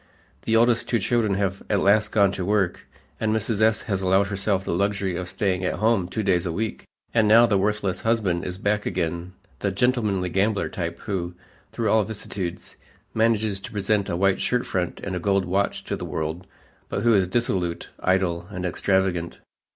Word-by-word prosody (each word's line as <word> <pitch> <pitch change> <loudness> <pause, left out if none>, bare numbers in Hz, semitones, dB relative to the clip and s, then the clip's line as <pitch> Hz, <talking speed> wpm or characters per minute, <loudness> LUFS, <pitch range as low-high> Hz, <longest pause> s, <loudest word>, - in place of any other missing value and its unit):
The 115 - +2
oldest 115 0 +3
two 120 - +3
children 110 -1 +1
have 95 -1 -1
at 100 - +2
last 105 +2 +3
gone 100 -3 +4
to 95 - -4
work, 100 -1 0 0.3
and 110 -1 0
Mrs. 110 -1 -1
S. 110 0 +3
has 95 -4 -2
allowed 95 +1 +3
herself 100 -1 0
the - - -1
luxury 100 0 0
of 90 0 -4
staying 95 -1 -1
at 90 - 0
home 110 -4 +2
two 110 +4 -3
days 90 -3 +1
a - - -1
week. 110 +7 -3 0.3
And 110 -2 +3
now 115 +3 +7
the 100 -4 +2
worthless 100 -1 -1
husband 105 -7 +1
is 90 0 -4
back 105 +2 0
again 85 +1 -3 0.3
the 100 - -1
"gentlemanly 105 -4 +1
gambler" 100 +3 +1
type 85 -1 -4
who, 90 -4 -3 0.4
through 110 -3 -1
all 110 -1 +4
vicissitudes, 95 -4 -5 0.4
manages 110 -3 +2
to 100 - -9
present 105 -1 0
a 85 - -1
white 95 +1 +3
shirtfront 95 -8 -1
and 95 -2 -3
a - - -2
gold 100 +1 +1
watch 95 +3 -1
to - - -3
the - - -7
world, 80 +3 -4 0.4
but 100 - -2
who 120 -1 +5
is 95 -3 +3
dissolute, 90 -5 -1
idle 90 -2 +1
and 90 -3 -5
extravagant. 90 -1 0
100 Hz, 190 wpm, -24 LUFS, 90-110 Hz, 0.4 s, now